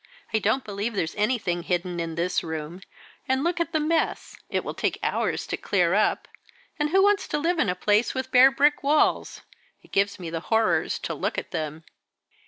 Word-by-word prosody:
"I 220 - +3
don't 220 +6 +1
believe 205 +2 -4
there's 160 -4 -1
anything 210 -5 0
hidden 175 0 -2
in 165 -1 -3
this 175 +2 0
room; 160 +2 -6 0.5
and 265 +1 +1
look 345 +1 0
at 335 - -1
the 315 - +1
mess, 320 +2 -1
it - - -1
will - - -5
take - - -1
hours - - -1
to - - -3
clear 180 -3 +1
it 205 - +4
up. 215 - +1 0.5
And 295 0 +1
who 385 +4 +4
wants 410 0 +3
to - - -1
live 335 +3 0
in 205 - +2
a 180 - 0
place 210 +6 +1
with 260 0 -3
bare 255 +1 +8
brick 285 +2 +2
walls? 295 +2 +1 0.4
It - - -21
gives 200 0 +1
me 170 -3 -6
the 165 - -2
horrors 225 -1 +2
to - - -4
look - - -3
at - - -5
them." 155 +1 -4
215 Hz, 205 wpm, -25 LUFS, 175-285 Hz, 0.5 s, bare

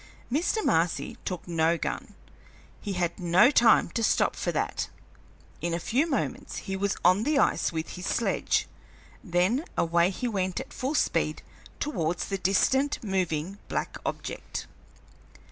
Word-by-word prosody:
Mr. 350 - +1
Marcy 165 +1 +1
took 180 -2 -4
no 165 0 +2
gun; - - -4 0.7
he 205 - -3
had 175 -2 -1
no 180 +8 +5
time 230 -5 +5
to 230 - -2
stop - - +2
for - - -1
that. - - -2 0.7
In 170 0 -1
a - - -2
few 260 - +1
moments 280 - -2
he 195 - -4
was 200 +1 -1
on 185 +3 +6
the 295 +5 +1
ice - - +2
with 160 -1 -3
his 180 0 -6
sledge, 235 - +1 0.6
then 185 - +1
away 170 +1 +3
he 200 +6 -3
went 185 -5 -1
at 265 - -8
full 270 +4 -2
speed - - +1 0.4
towards 175 - -1
the 195 -1 -3
distant 265 +10 +2
moving 185 -2 -1
black - - -3
object. - - -5
190 Hz, 145 wpm, -28 LUFS, 175-240 Hz, 0.7 s, on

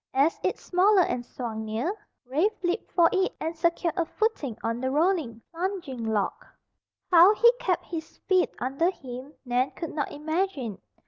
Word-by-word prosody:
As 280 +5 +3
its - - -2
smaller 375 +1 +4
end 245 -6 -3
swung 225 -3 -5
near, 225 - -2 0.3
Rafe 330 - 0
leaped 355 +4 -1
for 340 -2 +5
it 380 -1 +1
and 325 +1 -3
secured 335 0 +1
a 345 - +1
footing 325 - -2
on 230 +1 -1
the 260 - 0
rolling, 295 - 0
plunging 335 -8 -4
log. 215 -2 -1 0.7
How 360 +4 +8
he 470 +2 +7
kept 360 -7 0
his 325 -2 -7
feet 370 -2 +3
under 275 +7 +1
him 265 -3 -8
Nan 250 +2 +1
could 330 - -5
not 295 -2 -2
imagine. 300 - -2
320 Hz, 165 wpm, -27 LUFS, 255-365 Hz, 0.7 s, How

